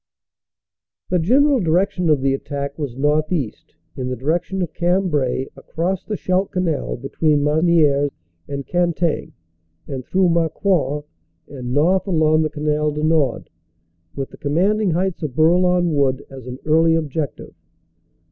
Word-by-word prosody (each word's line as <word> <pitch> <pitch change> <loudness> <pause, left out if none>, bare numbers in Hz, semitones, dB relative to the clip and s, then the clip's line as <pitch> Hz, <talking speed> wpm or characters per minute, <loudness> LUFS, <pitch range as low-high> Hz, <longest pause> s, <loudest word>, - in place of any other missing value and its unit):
The 180 - +3
general 270 - +3
direction 180 0 +1
of 150 -3 +3
the 135 0 +2
attack 140 0 -4
was 135 -5 -4
northeast, 150 - -1 0.2
in 130 -1 -4
the 130 - -2
direction 170 - -1
of 160 -3 -6
Cambrai 170 -8 0
across 180 +3 -3
the 210 - -4
Scheldt 185 +1 0
Canal 175 -5 -2
between 145 +3 0
Mas 150 +2 +2
nieres 150 -5 +3 0.4
and 140 -1 -5
Cantaing 175 0 0 0.5
and 135 -2 -5
through 185 +6 +2
Marcoing; 165 -3 +1 0.5
and 125 -3 -6
north 175 +9 +2
along 155 -3 +3
the 155 - 0
Canal 150 0 0
du 150 +1 -4
Nord 155 -6 +1 0.6
with 135 -1 -4
the - - -12
commanding 190 +8 +1
heights 180 +2 -1
of 145 -5 -4
Bourlon 175 +2 +3
Wood 140 -2 +1
as 130 -2 -10
an 125 0 -6
early 160 +1 +4
objective. 155 -3 -3
155 Hz, 140 wpm, -20 LUFS, 140-180 Hz, 0.6 s, early